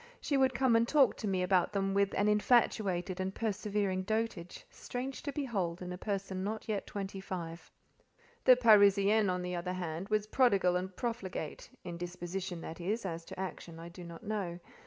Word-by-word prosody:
She 285 - -1
would 265 -2 +3
come 255 -2 +3
and 230 +1 +4
talk 280 -3 +4
to 215 - -4
me 185 -2 +1
about 180 0 +2
them 195 -1 0
with 200 0 +2
an 205 - +2
infatuated 205 -4 +2
and 190 +1 -2
persevering 205 -3 -1
dotage, 215 -4 -3
strange 255 +2 -5
to 285 - -3
behold 200 - -2
in 180 0 -5
a - - -6
person 195 -2 -3
not 215 +2 -4
yet 210 -3 -2
twenty 195 -1 -5
five. 170 -3 -6 0.8
The 255 - +9
Parisienne, 205 -3 +5
on 180 0 -1
the 180 0 -3
other 180 +1 -3
hand, 175 0 -4
was 210 -1 +1
prodigal 200 -7 +3
and 185 +1 -3
profligate 215 -10 -4
(in 175 -1 -6
disposition, 175 0 -5
that 165 +2 -7
is: 205 +5 -2
as 165 -2 -4
to - - -9
action, 175 -3 -6
I 170 +1 -8
do 175 +1 -10
not 170 -1 -10
know). 195 -5 -3
195 Hz, 185 wpm, -32 LUFS, 180-215 Hz, 0.8 s, The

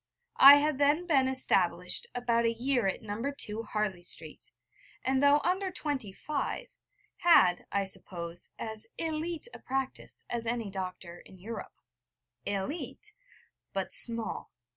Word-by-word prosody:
I 275 +1 +12
had 295 -1 +1
then 295 +5 +3
been 275 -6 +3
established 265 - +1
about 235 -1 +1
a 230 - +3
year 245 -1 +1
at 190 - -2
No. 210 +1 -5 0.3
II, 210 0 -5
Harley 210 -4 -1
Street, 160 -3 -4 0.5
and, 265 0 +2
though 285 +1 +5
under 375 +2 0
twenty 285 - -3
five, 290 +9 -4 0.5
had, 185 - +5
I 200 0 +1
suppose, 170 -2 -6
as 220 0 -5
élite 325 +4 -3
a - - -8
practice 265 0 -4
as 235 -1 -3
any 230 -3 -2
doctor 185 -2 -6
in 190 - -14
Europe. 215 +4 -8 0.7
Élite 200 - -4 0.6
but - - -3
small. 230 -1 0
235 Hz, 135 wpm, -30 LUFS, 200-285 Hz, 0.7 s, I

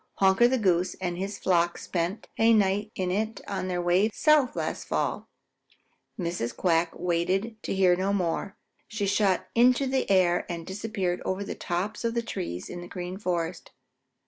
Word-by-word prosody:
Honker 195 +5 +5
the 260 +1 +1
Goose 180 -4 +1
and 180 -2 -3
his 195 +3 -4
flock 175 -2 +1
spent 175 +4 -3
a 225 +1 +6
night 205 +1 +1
in 185 -1 -1
it 215 +4 -1
on 195 -2 -3
their 180 -1 -1
way 180 +5 +3
south 300 0 +3
last - - -3
fall." - - -2 0.9
Mrs. 170 -10 -3
Quack 165 -2 +2
waited 180 +6 0
to - - -3
hear 185 -2 +4
no 190 +2 0
more. 190 0 -1 0.3
She 215 -1 -2
shot 195 -1 +2
up - - -25
into 250 +3 +4
the 265 0 0
air 180 -2 +3
and 170 -1 -5
disappeared 190 -2 -3
over 190 +2 -2
the - - -5
tops 195 +6 -3
of 230 0 -1
the 235 - 0
trees 180 - -5
in 175 - -7
the 175 - -8
Green 180 +1 -6
Forest. 175 -3 -2
190 Hz, 175 wpm, -27 LUFS, 175-210 Hz, 0.9 s, a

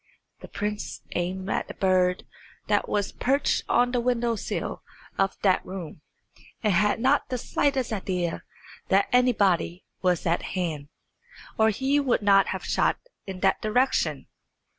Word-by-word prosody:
The - - -10
prince 210 0 -4
aimed 185 +2 -2
at - - -2
a - - -7
bird 185 -1 +2 0.4
that - - +1
was 205 -1 0
perched 275 +3 +1
on 245 0 +3
the 250 - +1
window 240 -1 +1
sill - - -4 0.4
of 195 0 +1
that 190 -2 +3
room, 180 -5 -8 0.6
and 210 -3 +3
had 210 +5 +2
not 265 +4 +2
the 255 - -1
slightest 265 -1 0
idea 180 -4 -2 0.5
that 195 +1 +3
anybody 200 -8 +2 0.2
was 180 -3 +1
at 170 0 +1 0.2
hand, 155 -5 -3 0.7
or 220 0 +4
he 270 +7 +1
would 260 -6 +1
not 195 -1 +5
have - - -4
shot - - +1 0.3
in 190 -1 -6
that - - +2
direction. 245 +5 +1
205 Hz, 145 wpm, -26 LUFS, 185-245 Hz, 0.7 s, not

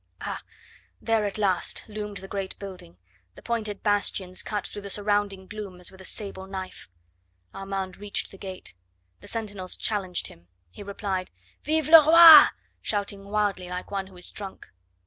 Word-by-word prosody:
Ah! - - -4 0.6
there 225 -2 +1
at 200 - -6
last 190 -4 0
loomed 210 -1 -6
the 195 - -8
great 195 -1 -4
building, 185 - -10 0.4
the - - -13
pointed 215 -4 -3
bastions 200 -3 0
cut 210 -1 -3
through 205 - -7
the 200 - -8
surrounding 205 -1 -1
gloom 200 -2 -8
as 180 - +1
with 190 0 -15
a - - -9
sable 195 -2 -5
knife. 190 - -7 0.6
Armand 195 -1 -5
reached 205 0 -3
the 195 - -13
gate; 190 -2 -7 0.5
the - - -14
sentinels 205 -5 -5
challenged 195 -5 -1
him; 85 +1 -10 0.2
he - - -12
replied: 195 -2 -4 0.3
"Vive 310 +1 0
le 320 0 +10
roi!" 330 0 +11 0.3
shouting 200 -1 -2
wildly 200 -3 -1
like 180 +2 -6
one 195 -1 -3
who 190 -1 -15
is 180 - -5
drunk. 195 -2 -8
200 Hz, 165 wpm, -26 LUFS, 190-210 Hz, 0.6 s, roi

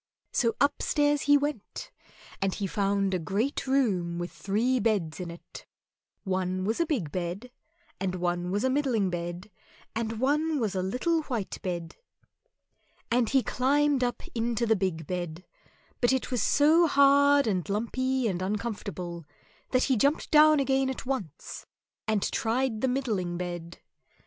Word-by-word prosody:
So 230 -1 +1
upstairs 290 +1 +2
he 290 - +8
went, 285 -7 -4 0.5
and 195 -1 0
he 200 - -3
found 195 0 0
a 185 - +1
great 210 - -2
room 195 -11 +1
with 175 0 -4
three 235 +6 0
beds 200 -8 0
in 180 -2 -5
it; 170 0 -11 0.6
one 185 -1 -1
was 220 +3 -1
a 335 - +2
big 215 - -1
bed, 185 +8 -4 0.5
and 185 -1 -2
one 175 0 -1
was 205 +4 -1
a 260 - +2
middling 250 -9 +1
bed, 175 +3 -5 0.4
and 225 -1 -2
one 300 +4 +1
was 215 -5 -1
a 185 - -1
little 255 - 0
white 230 -7 -4
bed; 170 -3 -4 1.1
and 240 -2 +2
he 265 -2 +3
climbed 280 +1 +2
up 245 -1 -2
into 235 0 0
the 220 -1 +3
big 180 -5 -2
bed, 175 -1 -5 0.6
but 240 - +4
it 265 0 -1
was 245 -4 0
so 315 +8 +4
hard 280 0 +5
and 195 -3 -1
lumpy 255 +4 0
and 185 -3 -2
uncomfortable 195 -4 -4 0.5
that 255 -1 +2
he 265 - +2
jumped 280 +7 +1
down 305 0 +7
again 270 -1 +1
at 265 - -5
once, 210 - -5 0.4
and 215 -2 +1
tried 230 0 0
the 265 - +2
middling 215 -10 -1
bed. 175 -1 -5
220 Hz, 155 wpm, -28 LUFS, 185-265 Hz, 1.1 s, he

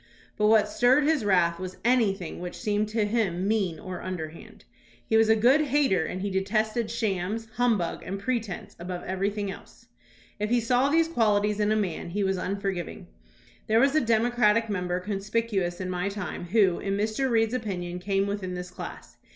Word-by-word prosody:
But 210 - +2
what 215 -1 +5
stirred 250 +7 +3
his 300 -4 +2
wrath 175 -4 +2
was 185 -1 -6
anything 210 -8 +1
which 180 0 -6
seemed 210 0 -1
to 220 -1 0
him 200 -4 0
mean 195 -7 0
or 185 -1 -7
underhand. 165 -3 -7 0.4
He 220 - 0
was 220 0 +5
a 220 - +6
good 250 +7 +4
hater 270 - +2
and 185 +3 -4
he 200 - -2
detested 215 +4 0
shams, 220 -1 -2
humbug, 225 -8 +1
and 190 +3 -5
pretence 225 -4 -3
above 180 +1 -5
everything 200 +2 -2
else. - - -14 0.5
If 210 0 -1
he 245 +1 +3
saw 245 +4 +2
these 325 +2 +3
quahties 210 -7 +1
in 210 0 +2
a - - +3
man, 190 -5 -2
he 200 +4 -1
was 190 -1 0
un 195 +2 -2
forgiving. 190 -4 -4 0.6
There 220 +1 +4
was 275 +3 +4
a 310 - +3
Democratic 230 -1 +2
member 180 -2 -1
con 200 +2 -3
spicuous 195 -4 -1
in 185 - -3
my 180 +2 -1
time 200 -3 -5
who, 190 -1 +3
in 195 0 -2
Mr. 215 +6 0
Reed's 225 -1 +2
opinion, 180 -7 -3
came 195 +1 0
within 200 -2 -3
this 180 0 -6
class. - - -9
205 Hz, 185 wpm, -27 LUFS, 185-225 Hz, 0.6 s, a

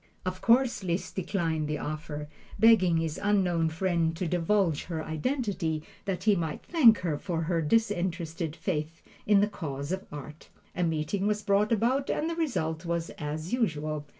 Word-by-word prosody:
Of 185 0 -3
course 240 -3 +3
Liszt 175 0 -2
declined 165 -5 -1
the 150 0 -1
offer, 150 0 -5 0.3
begging 195 -6 +5
his 160 -1 -2
unknown 180 -5 +2
friend 165 -1 0
to 180 - -2
divulge 175 -1 +1
her 160 -3 -4
identity 165 - -2 0.2
that 185 -2 -2
he 210 -1 +4
might 165 -4 -3
thank 250 -10 +6
her 160 -5 -1
for 165 -3 -2
her 165 0 0
disinterested 175 -4 0
faith 160 -3 -3 0.2
in 205 -1 +6
the 205 - +3
cause 145 -7 -5
of 190 +1 -3
Art. 150 +1 -9 0.3
A - - -1
meeting 165 +5 0
was 210 0 0
brought 205 +1 +2
about 245 +5 +1
and 310 - 0
the - - -3
result 165 - -1
was 170 -1 -2
as 155 +4 -4
usual. 155 -10 -1
175 Hz, 165 wpm, -28 LUFS, 160-205 Hz, 0.3 s, thank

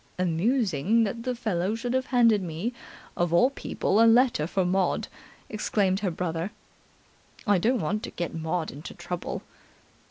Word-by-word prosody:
"Amusing 185 - +2
that 225 +2 -2
the 250 +1 -2
fellow 210 -4 -1
should 240 +2 -3
have 260 0 0
handed 230 -5 +4
me 180 +7 -3 0.4
of 175 -1 0
all 245 +11 +4
people 220 -5 0
a 230 - +7
letter 235 - +4
for 185 +1 0
Maud," 185 0 +1 0.4
explained 200 -3 0
her 200 -2 0
brother. 170 +1 -3 1.0
"I 205 -4 +4
don't 235 +4 +1
want 210 +7 -1
to - - -5
get 175 -1 -4
Maud 160 0 -2
into 145 +4 -9
trouble." 175 0 -5
195 Hz, 155 wpm, -27 LUFS, 175-230 Hz, 1.0 s, a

